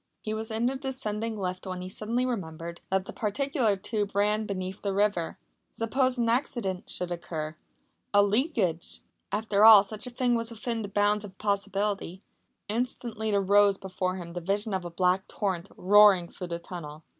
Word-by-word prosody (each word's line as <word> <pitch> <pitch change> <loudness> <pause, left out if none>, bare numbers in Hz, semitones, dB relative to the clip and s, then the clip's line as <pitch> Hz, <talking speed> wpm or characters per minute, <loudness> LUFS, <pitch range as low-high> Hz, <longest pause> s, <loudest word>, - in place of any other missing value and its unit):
He 215 - -4
was 220 0 -3
in 225 +1 -1
the 260 +2 +1
descending 230 -5 -3
lift 185 -1 -4
when 185 -1 -4
he - - -5
suddenly 225 +6 -1
remembered 170 -7 -5
that 190 0 +1
that - - -7
particular 235 0 +1
tube 205 0 -2
ran 210 +1 +2
beneath 190 -1 -4
the 200 -1 -2
river. 200 -5 +1 0.3
Suppose 255 +3 0
an 235 -1 +1
accident 230 -6 -1
should 180 -1 -1
occur 160 -3 -4 0.6
a 205 0 +6
leakage! 205 - 0 0.3
After 210 -1 +1
all 215 -3 +10
such 210 +3 -4
a - - -4
thing 245 0 0
was 230 -1 0
within 230 0 -3
the 205 - -4
bounds 205 +1 +2
of 195 -2 -10
possibility. 200 -2 -1 0.4
Instantly 225 -1 -2
there 200 -1 +2
rose 200 0 +4
before 185 -1 -3
him 170 -2 -7
the 175 - -4
vision 200 +4 0
of 190 -1 -1
a - - -4
black 180 +2 +1
torrent 190 -3 -2
roaring 200 -2 +6
through 180 - -8
the 170 -1 -3
tunnel. 165 -3 -8
205 Hz, 180 wpm, -28 LUFS, 185-220 Hz, 0.6 s, all